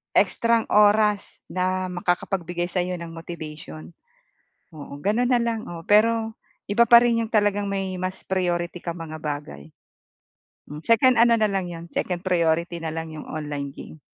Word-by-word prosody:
extrang 230 -1 +3
oras 210 0 +3
na 185 0 -1
makakapagbigay 175 0 -2
sa'yo 180 0 -1
ng 170 - -6
motivation. 155 - -9 0.8
Oo, 145 -2 -9
gano'n 220 +5 +1
na 245 -2 +3
lang. 230 -2 -2
Oo, 170 -1 -7
pero 225 +1 +3 0.3
iba 235 +3 +2
pa 235 - +9
rin 235 -1 +2
'yong 225 - -2
talagang 205 -1 +2
may 195 -1 -2
mas 185 +1 -5
priority 175 -2 -1
kang 170 0 -5
mga 155 -2 -7
bagay. 145 - -6 1.0
Hmm, 150 - -7
second 235 +1 +5
ano 235 0 +6
na 215 -2 +2
lang 195 -2 -1
'yon, 170 -1 -8
second 180 -1 -2
priority 170 -1 +1
na 160 -1 -5
lang 160 0 -5
'yong 155 -1 -8
online 145 -2 -5
game. 155 - -11
180 Hz, 155 wpm, -24 LUFS, 165-210 Hz, 1.0 s, pa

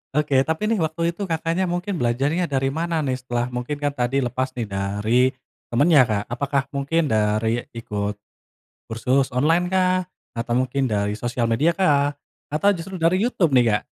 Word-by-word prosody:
Oke. 150 -3 +3
Tapi 210 +8 0
nih 220 - +1
waktu 165 +1 0
itu 190 +3 -5
Kakaknya 165 +3 -1
mungkin 175 +1 -2
belajarnya 140 +9 +1
darimana 155 +4 -1
nih? 130 -2 -1
Setelah 120 -1 -2
mungkin 125 +4 -3
kan 145 0 -1
tadi 135 0 0
lepas 130 +1 -2
nih 120 -3 -3
dari 100 +5 0 0.5
temennya, 145 +4 +5
Kak. 105 -2 -1
Apakah 140 +2 0
mungkin 140 +2 0
dari 110 +2 +1
ikut 105 -2 -3 0.7
kursus 130 +4 +1
online 165 +7 +3
kah? 185 -1 +1 0.2
Atau 120 +1 -2
mungkin 130 +1 -1
dari 105 -2 0
sosial 120 0 -2
media 140 +9 +2
kah? 145 -6 +2 0.3
Atau 175 +8 +2
justru 185 +1 -6
dari 170 +3 +2
Youtube 195 - +1
nih, 125 -2 +5
Kak? - - -14
140 Hz, 165 wpm, -22 LUFS, 120-165 Hz, 0.7 s, temennya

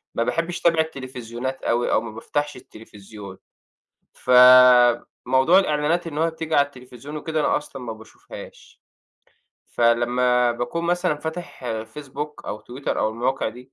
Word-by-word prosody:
ما 115 - +1
باحبش 165 +6 -2
أتابع 165 -2 +3
التليفزيونات 130 -3 -6
أوي 120 +1 0
أو - - +2
ما 115 -1 -8
بافتحش 145 +6 -4
التليفزيون. 105 -4 -13 0.8
ف - - -15
آآ 125 -1 +7 0.2
موضوع 130 +9 +4
الإعلانات 160 0 0
إن 150 -2 -7
هو 165 +1 +1
بتيجي 160 -1 -4
على 140 - +4
التليفزيون 130 +1 -11
وكده 155 +1 -3
أنا 150 - +2
أصلًا 140 -2 -9
ما 115 -2 -6
باشوفهاش. 110 0 -14 0.9
فلمّا 120 +1 +2
باكون 120 +8 -4
مثلًا 175 -1 0
فاتح 160 -1 -7
آآ 110 -2 -3
Facebook 145 +5 -8
أو 105 - -5
Twitter 130 +3 -9
أو - - +1
المواقع 120 +4 -2
دي، 125 +4 -13
130 Hz, 150 wpm, -22 LUFS, 120-150 Hz, 0.9 s, آآ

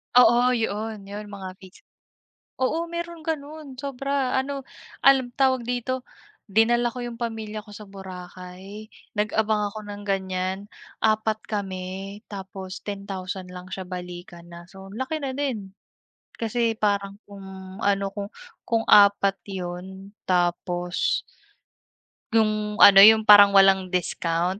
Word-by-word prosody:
Oo, 250 0 +6
'yoon 220 -2 -3
yun 205 +1 -6
mga 200 -2 -7
Piso, 190 -1 -16 0.8
oo 325 +6 0
meron 340 -1 -5
gano'n 305 -2 -5
sobra, 275 -1 -1
ano 275 +1 -4 0.4
alam 265 -2 +5
tawag 260 -3 +2
dito, 250 +1 -2 0.4
dinala 230 +4 +3
ko 250 - -5
yung 235 -1 -7
pamilya 220 -2 -4
ko 210 - -14
sa 210 - -9
Boracay, 185 +2 -10 0.3
nag-abang 215 0 +1
ako 215 - -7
ng 205 0 -8
gan'yan, 190 -1 -1 0.4
4 215 0 +2
kami 195 0 -5
tapos 190 -1 -7
10,000 190 -2 -6
lang 180 0 -9
siya 190 - -4
balikan 175 -1 -8
na. 170 0 -11
So, 190 +1 -12
laki 260 +8 -3
na 265 -1 -2
din, 235 -9 -3 0.7
kasi 230 0 0
parang 200 -1 0
kung 190 -1 -10
ano 200 -1 +2
kung 200 -1 -5 0.4
kung 230 -1 +1
4 200 -1 +6
'yon 190 +2 -7
tapos 175 0 0 1.1
yung 215 -1 +1
ano, 195 -1 +10
yung 220 +2 +9
parang 205 -1 +8
walang 195 -1 +6
discount 180 0 -1
205 Hz, 125 wpm, -24 LUFS, 190-235 Hz, 1.1 s, ano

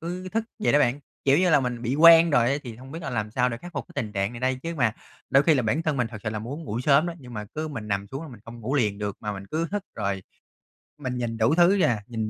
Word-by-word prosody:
cứ 180 +3 -5
thức 220 +4 -1
vậy 215 - +1
đó 145 - +6
bạn. 140 -1 +2 0.2
Kiểu 140 +1 +5
như 180 0 +3
là 145 -3 +5
mình 125 -2 -3
bị 125 +2 -1
quen 165 +2 +8
rồi 120 -5 +4
á 140 - +1
thì 120 -4 -8
không 130 +3 -12
biết 165 - -7
là 135 - -4
làm 110 -3 -2
sao 125 +3 +1
để 115 - -4
khắc 175 +7 -11
phục 145 - -4
cái - - -15
tình 105 -2 -7
trạng 100 +2 -1
này 120 - -8
đây? 130 0 0
Chứ 165 0 -4
mà 125 -7 +2 0.4
đôi 135 +2 +6
khi 160 +1 +4
là 130 - +1
bản 120 +9 0
thân 155 -3 0
mình 125 -3 +1
thực 110 -3 -9
sự 105 - -2
là 105 - -3
muốn 135 +9 -6
ngủ 115 -4 -3
sớm 140 +5 +4
đó 170 - -4
nhưng 125 -3 -11
mà 105 -1 -4
cứ 155 +1 -3
mình 115 -8 -6
nằm 100 0 -1
xuống 135 +3 -5
là 160 - -8
mình 120 -6 -12
không 115 0 -10
ngủ 125 +6 -3
liền 105 -7 +1
được 105 -1 -3
mà 105 - -3
mình 100 -1 -8
cứ 160 +8 -2
hức 205 0 -2
rồi 100 -1 -2 0.8
mình 130 -3 -4
nhìn 115 -2 -3
đủ 115 +6 +3
thứ 175 +1 +6
vậy - - +4
à, 110 -4 -1
nhìn 110 -2 -3
125 Hz, 320 wpm, -25 LUFS, 110-155 Hz, 0.8 s, quen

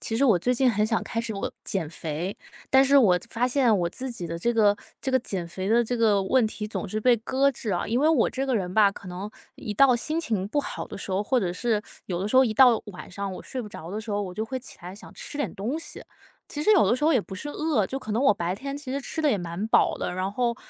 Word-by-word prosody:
其 225 - -2
实 280 - +3
我 215 -9 +5
最 250 +8 +1
近 255 0 +3
很 210 0 +1
想 225 0 0
开 230 - -2
始 230 -2 -4
哦， 195 - -3
减 165 -6 -2
肥， 165 +4 -4 0.4
但 265 0 +6
是 280 +1 +4
我 190 -9 +5
发 235 +2 0
现 250 -4 +3
我 170 - +1
自 260 +9 -4
己 235 -8 -5
的 170 0 -5
这 235 - +1
个 215 -3 +4 0.2
这 265 - -3
个 260 - +5
减 190 -8 -4
肥 185 +3 -5
的 235 +2 +4
这 245 +2 -2
个 215 -4 +3
问 235 +3 +3
题 215 0 -5
总 210 -1 -4
是 215 - -2
被 245 +3 +4
搁 265 +5 +1
置 230 -4 -4
啊。 175 - -1
因 235 +4 0
为 305 - +4
我 315 -8 +3
这 270 +1 -2
个 260 -3 +1
人 180 -3 -3
吧， 205 0 +5
可 195 - -12
能 185 +4 -6 0.3
一 210 - -5
到 260 +2 +6
心 310 +7 -2
情 215 - -2
不 290 - -1
好 290 - -3
的 - - -8
时 200 - -6
候， 190 +2 +1
或 255 +5 +1
者 185 -6 -1
是 215 +2 0 0.2
有 175 -2 -2
的 190 - -2
时 210 - -3
候 260 - +8
一 225 -4 0
到 245 -2 +6
晚 190 -3 -10
上 200 +1 -4
我 - - -8
睡 255 - -5
不 215 - -7
着 170 -4 -9
的 210 - -4
时 220 0 -8
候， 205 0 0
我 185 -2 -6
就 215 +4 -3
会 260 +4 -4
起 255 - -12
来 180 +1 -8
想 215 - -12
吃 - - -8
点 290 - -2
东 235 +10 -3
西。 330 - -9 0.4
其 295 - -5
实 425 - +3
有 395 - +5
的 - - +4
时 255 - -5
候 315 - +5
也 265 - +4
不 195 - -9
是 210 +10 -6
饿， 290 -9 0
就 270 - -4
可 215 -5 -6
能 230 +5 +1
我 275 - +6
白 175 -2 -2
天 275 +7 -5
其 285 -3 -7
实 280 - -2
吃 300 - -4
得 300 - +4
也 215 - +2
蛮 175 +3 -4
饱 - - +3
的。 - - -3
然 185 +2 -2
后， 235 +3 0
220 Hz, 320 characters per minute, -26 LUFS, 195-260 Hz, 0.4 s, 候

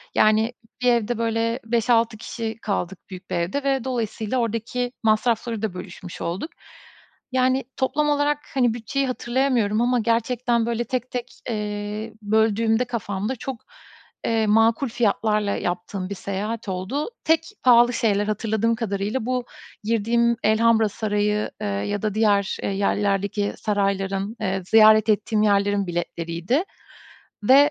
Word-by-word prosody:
yani, 220 +2 +3 0.3
bir 250 0 +4
evde, 235 0 0
böyle, 230 +1 0
5-6 230 0 +2
kişi 225 0 -5
kaldık 195 -3 -2
büyük 185 0 -10
bir - - -2
evde 175 +12 -1
ve 270 -2 +1
dolayısıyla 235 -1 -2
oradaki 235 +2 -2
masrafları 225 0 +1
da 215 -5 -2
bölüşmüş 180 -1 -9
olduk. 185 - -3 0.8
Yani, 260 +1 +2
toplam 295 +3 +1
olarak, 290 0 +1
hani, 245 -4 +2
bütçeyi 270 +4 -2
hatırlayamıyorum 240 -4 +1
ama 245 0 +2
gerçekten, 235 +1 +1
böyle, 235 0 -1
tek 255 -1 -3
tek, 250 -1 -5 0.2
eee, 210 0 -4
böldüğümde 220 +2 +2
kafamda 220 0 -3
çok, 255 +1 -6 0.6
eee, 225 -1 +1
makul 225 +4 +3
fiyatlarla 210 -2 +1
yaptığım 185 +2 -3
bir 200 - -4
seyahat 200 +3 -4
oldu. 190 - -2
Tek 320 0 +3 0.2
pahalı 240 -1 +6
şeyler, 210 -4 +1
hatırladığım 220 +1 0
kadarıyla, 215 +1 -2
bu 250 -1 -1 0.4
girdiğim 230 +2 +2
Elhamra 220 0 +4
Sarayı, 210 0 -1
eee, 210 - -2
ya 205 0 -2
da 215 -2 -1
diğer, 205 -3 +2
eee, - - 0
yerlerdeki 200 +1 0
sarayların, 195 0 -1
eee, 190 -2 -1
ziyaret 215 0 +6
ettiğim 215 +1 +2
yerlerin 200 -1 +2
biletleriydi. 170 - -2 0.8
Ve, 260 - +6
eee, 290 +1 +4
220 Hz, 135 wpm, -23 LUFS, 205-240 Hz, 0.8 s, pahalı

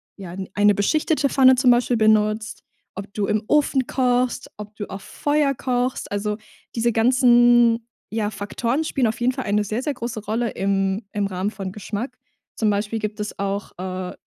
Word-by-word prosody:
ja, 185 -2 -9 0.2
eine 205 0 +4
beschichtete 300 - +1
Pfanne 260 -1 +6
zum 255 0 +3
Beispiel 245 0 +2
benutzt, 215 0 +2 0.4
ob 200 0 -7
du 210 -2 -1
im 215 0 0
Ofen 280 -3 +2
kochst, 250 -1 0
ob 210 0 -9
du 205 - -6
auf 195 +1 -7
Feuer 290 -1 0
kochst. 250 -1 -2
Also 210 +1 -2 0.4
diese 235 0 +1
ganzen, 240 -1 +4 0.2
ja, 215 -1 -2
Faktoren 235 +8 -2
spielen 265 -5 +1
auf 220 0 -3
jeden 245 +2 +1
Fall 260 - -4
eine 210 +1 +1
sehr, 215 +4 -2
sehr 295 - -1
große 235 -3 -5
Rolle 225 +2 -1
im 195 +1 0
im 205 -1 -1
Rahmen 190 +2 -2
von 190 -3 -6
Geschmack. 210 +4 -5 0.4
Zum 220 - +1
Beispiel 210 +2 -1
gibt 215 0 -4
es 210 0 -5
auch, 200 0 -3
äh, 185 0 -5
220 Hz, 175 wpm, -22 LUFS, 205-245 Hz, 0.4 s, Pfanne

